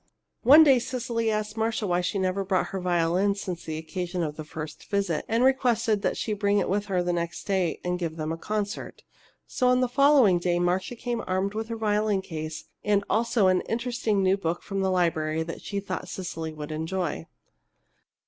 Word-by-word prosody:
One 290 +6 +9
day 270 -4 +6
Cecily 235 -2 -2
asked 215 0 -2
Marcia 225 -1 -1
why 180 -2 +1
she 180 +3 -2
never 190 +1 0
brought 190 -1 +1
in - - -4
her 195 - -3
violin 180 +2 +1
since 185 -4 -5
the 155 -1 -4
occasion 175 +2 -3
of 150 -2 -3
the 155 - -6
first 155 0 -8
visit, 195 -6 0
and 230 +2 +2
requested 235 -5 +2
that - - 0
she 215 - -2
bring 205 0 +1
it 195 - +1
with 205 +2 -1
her 185 -3 0
next 170 -1 -2
day 190 -4 0
and 180 0 -1
give 165 -2 -3
them 155 -1 -3
a 165 - -3
concert. 210 +2 -4 0.4
So 250 - 0
on 250 0 +4
the 255 - +2
following 260 -7 +5
day 175 0 +1
Marcia 180 +6 0
came 240 0 -3
armed 190 +2 0
with 220 +1 -3
her 230 -1 -4
violin 210 -2 +1
case 155 -3 -6 0.2
and 205 -1 +2
also 230 -1 +2
an 185 -1 +4
interesting 230 -4 0
new 190 +1 +3
book 170 -2 -2
from 195 -1 -3
the 190 - +1
library 160 -3 +1
that 165 +1 -7
she 200 - -3
thought 190 -2 -5
Cecily 165 -3 -5
would 155 0 -7
enjoy. 160 - -3
195 Hz, 200 wpm, -26 LUFS, 175-220 Hz, 0.4 s, One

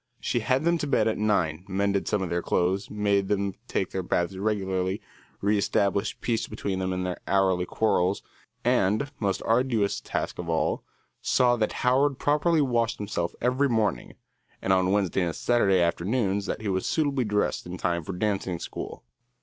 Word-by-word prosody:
She 120 - 0
had 130 +5 +1
them 170 0 +2
to 150 - -2
bed 140 - +2
at 110 - 0
nine, 90 -6 +1
mended 100 0 0
some 105 -3 +1
of 90 - -4
their 85 0 0
clothes, 95 +4 0
made 100 -2 +1
them 100 -1 0
take 95 - -1
their 95 - -2
baths 90 +1 -1
regularly, 95 -1 -1 0.4
reëstablished 100 0 +1
peace 115 -2 0
between 100 -3 -3
them 95 0 -1
in 90 0 -2
their 90 -1 -4
hourly 95 -2 +2
quarrels, 100 -3 +1 0.4
and, 110 +10 +2
most 100 -3 -1
arduous 115 -3 +1
task - - -3
of 85 -1 -4
all, 80 -1 0 0.4
saw 125 -1 +3
that 110 -2 0
Howard 135 +2 +3
properly 150 +3 +2
washed 120 -4 +1
himself 100 -4 -3
every 130 +3 +2
morning, 110 -3 0 0.4
and 95 - +1
on 95 0 +3
Wednesday 95 -2 +1
and 85 -3 -1
Saturday 100 -6 +3
afternoons 100 +4 0
that - - -3
he 110 - -4
was 95 -1 0
suitably 145 -5 +1
dressed 105 -4 -1
in 90 +1 -6
time 85 -2 -1
for 95 - -5
dancing 95 -2 -1
school. - - -7
100 Hz, 175 wpm, -26 LUFS, 95-115 Hz, 0.4 s, saw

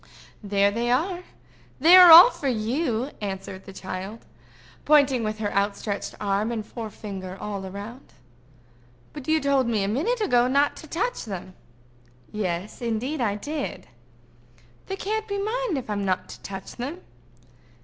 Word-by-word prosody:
"There 200 -1 +2
they 235 +3 -2
are; 350 +8 0 0.5
they 330 +6 +7
are 365 -1 +10
all 350 +9 +11
for 285 - -5
you," 245 +2 -1
answered 195 -1 -6
the 195 - -10
child, 190 +3 -7 0.6
pointing 280 -5 +4
with 215 0 -2
her 210 -1 -3
outstretched 200 +1 -2
arm 205 +2 0
and 220 -3 -4
forefinger 200 -5 -7
all 205 -2 -5
round. 210 +7 -10 1.0
"But 295 -2 -9
you 315 0 +3
told 275 -3 +1
me, 220 -4 0
a - - -1
minute 325 - 0
ago, 250 - +3
not 280 +3 +2
to 315 - -11
touch 395 - -2
them." 185 -3 -7 0.8
"Yes, 190 -1 -4
indeed, 245 +5 -2
I 205 -4 0
did." 285 - -5 1.0
"They 385 - -3
can't 435 +3 -3
be 400 -1 -3
mine, 435 - -1
if 260 - -5
I'm 205 -1 -2
not 185 -1 -1
to - - -11
touch 195 -1 -8
them." 285 +9 -5
235 Hz, 150 wpm, -25 LUFS, 200-305 Hz, 1.0 s, all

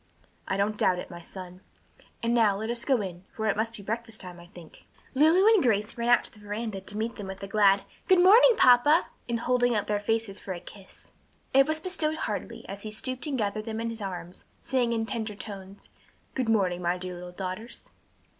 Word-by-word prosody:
"I 195 - -1
don't 210 +2 0
doubt 180 - +3
it, 180 - -7
my 175 - -8
son. 180 +1 -10 0.6
And 230 0 +1
now 220 -4 +3
let 220 +3 -3
us 235 0 -1
go 260 -5 +2
in, 180 -2 -7
for 220 - -3
it 215 - +2
must 225 +2 -2
be 200 - -10
breakfast 225 +1 -4
time, 180 -2 -8
I 175 - -14
think." 175 -3 -15 0.3
Lulu 320 +8 +5
and 420 - +4
Grace 210 -4 +1
ran 235 0 -2
out 240 -2 +5
to - - -7
the 215 - -17
veranda 210 -1 -5
to 205 +2 -9
meet 225 +2 -3
them 205 -3 -6
with 190 +1 -8
a - - -4
glad, 200 -1 +4 0.2
"Good 375 -3 +6
morning, 430 +7 +7
papa," 260 +7 +5 0.2
and 235 -1 -1
holding 245 -1 +2
up 210 - 0
their 210 -1 0
faces 220 -1 -1
for 190 - -5
a 175 - -7
kiss. 195 +2 -15 0.4
It 270 +1 +6
was 310 0 0
bestowed 315 -3 0
heartily, - - -5
as 200 +1 -7
he 215 - -6
stooped 255 +6 -1
and 280 -3 -1
gathered 215 -1 -2
them 225 -1 -4
in 230 0 -2
his 225 -1 -7
arms, 180 -2 -7
saying 245 -2 0
in 225 -1 0
tender 220 -2 -4
tones, 200 -1 -10 0.4
"Good 255 -3 -1
morning, 185 -5 +1
my 175 +1 0
dear 180 0 -6
little 180 0 -8
daughters." 185 +5 -7
215 Hz, 220 wpm, -27 LUFS, 195-240 Hz, 0.6 s, morning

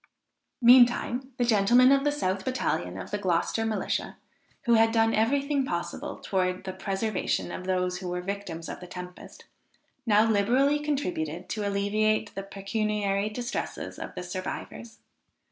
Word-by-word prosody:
Meantime 245 +1 +5
the 245 - +2
gentlemen 240 +4 +5
of 275 0 +4
the 290 - +2
south 190 -9 -1
battalion 90 - -2
of - - -8
the 205 - -1
Gloucester 190 +4 0
Militia, 220 - -2 0.5
who 240 -3 +3
had 225 0 +5
done 225 0 +3
every 260 +6 +2
thing 280 -1 0
possible 285 - -4
towards 185 -1 -1
the 190 -1 -5
preservation 195 +1 -2
of 185 - -6
those 180 -1 0
who 185 - -6
were 180 0 -2
the - - -14
victims 190 -4 -5
of - - -6
the 180 - -10
tempest, 180 0 -10 0.6
now 215 +1 +5
liberally 245 +8 +3
contributed 180 - -3
to 210 -2 -2
alleviate 215 +2 0
the 195 - -4
pecuniary 200 0 -1
distresses 240 +3 -5
of - - -7
the - - -5
survivors. 185 +5 -6
210 Hz, 155 wpm, -27 LUFS, 185-240 Hz, 0.6 s, Meantime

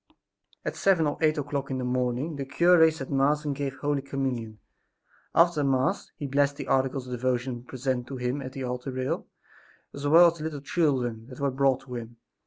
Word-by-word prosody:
At - - -2
seven 185 -5 +3
or 145 - -2
eight 155 0 +3
o'clock 140 -1 -3
in 135 - -2
the 130 - -3
morning 125 +4 -1
the 140 - -3
cure 160 +4 +5
said 150 -4 -6
Mass 145 +2 +2
and 145 -2 -1
gave 135 -1 -3
Holy 145 -1 -1
Communion. 130 -5 -3 0.8
After 170 -3 +4
Mass 135 -1 0
he 145 - -5
blessed 140 +1 +2
the - - -5
articles 130 0 0
of 125 - -6
devotion 125 0 -1
presented 130 -1 -3
to 135 - -6
him 125 +3 -2
at 130 -1 -7
the 135 - -5
altar 125 +1 -4
rail, 130 0 -3 0.7
as 140 0 -4
well 170 +3 +7
as 170 - -13
the - - -5
little 155 -2 -4
children 130 -8 0
that 130 -1 -11
were 140 -1 +1
brought 135 0 +2
to 135 -2 -10
him. 120 -1 -7
135 Hz, 200 wpm, -27 LUFS, 125-145 Hz, 0.8 s, well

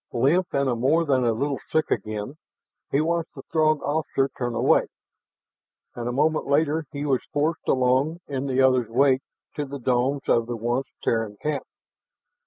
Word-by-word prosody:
Limp, 145 +9 +2
and 140 0 +1
more 160 +6 +3
than 130 -4 +2
a 120 - +3
little 135 +5 -1
sick 155 - +1
again, 110 +5 -3 0.5
he 140 - +1
watched 165 +1 -1
the 135 - -9
Throg 155 -2 +2
officer 145 -2 0
turn 120 -2 -3
away. - - +3 1.1
And 120 0 -4
a - - -1
moment 155 +5 +1
later 150 +2 +1
he 145 -1 -4
was 135 -3 +1
forced 155 +3 -1
along 130 +6 +2
in 140 -1 -3
the 135 0 +2
other's 130 -3 +3
wake 130 +2 +3 0.4
to 150 - 0
the 140 +1 -6
domes 130 +2 0
of 115 -1 +2
the 120 -1 -3
once 120 +4 -1 0.2
Terran 110 -2 -1
camp. 150 -3 -2
135 Hz, 170 wpm, -24 LUFS, 125-150 Hz, 1.1 s, more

